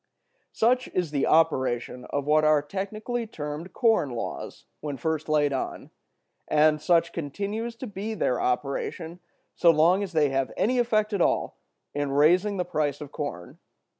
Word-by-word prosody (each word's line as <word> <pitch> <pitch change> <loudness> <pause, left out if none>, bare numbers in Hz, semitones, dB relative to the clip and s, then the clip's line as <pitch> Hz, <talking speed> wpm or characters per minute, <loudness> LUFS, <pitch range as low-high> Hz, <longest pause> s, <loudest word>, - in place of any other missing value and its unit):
Such 250 +3 +2
is 175 -4 0
the 140 -2 0
operation 130 -6 +1
of 145 -1 -3
what 155 +1 +3
are 155 -1 +4
technically 215 +8 -4
termed 150 -1 -6
corn 225 - +2
laws, 120 -2 -6
when 145 -2 -5
first 160 +3 -2
laid 145 -2 +2
on; 130 - -4 0.6
and 150 0 +3
such 170 +1 +2
continues 205 - -4
to 250 - -7
be 210 0 -5
their 125 - 0
operation 145 +6 -2 0.3
so 170 - +4
long 165 +4 +4
as 195 -3 -4
they 150 -3 +3
have 135 0 -1
any 250 +3 +2
effect 215 -3 +1
at 200 - 0
all - - 0 0.3
in 145 -1 -2
raising 180 +8 +3
the 180 - -1
price 150 -4 -1
of 150 -2 -8
corn. 115 - -6
160 Hz, 160 wpm, -26 LUFS, 145-200 Hz, 0.6 s, are